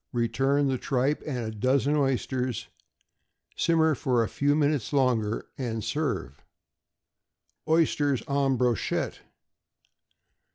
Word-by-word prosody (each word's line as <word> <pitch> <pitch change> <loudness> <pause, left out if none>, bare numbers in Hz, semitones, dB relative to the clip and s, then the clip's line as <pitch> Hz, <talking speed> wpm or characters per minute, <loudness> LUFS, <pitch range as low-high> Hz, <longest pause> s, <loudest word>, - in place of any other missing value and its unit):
Return 135 +4 +1
the 130 -2 -1
tripe 135 +2 0
and 125 -6 -3
a 110 - -4
dozen 130 +6 +1
oysters; 130 -3 -1 0.9
simmer 160 -2 +3
for 125 -3 +1
a - - -1
few 145 +9 +1
minutes 145 -6 +1
longer, 120 -6 +1
and 115 -4 -3
serve. 70 -6 -3 1.2
=Oysters 145 -5 +2
en 140 -2 +1
Brochette. 120 -3 -1
130 Hz, 100 wpm, -27 LUFS, 120-145 Hz, 1.2 s, simmer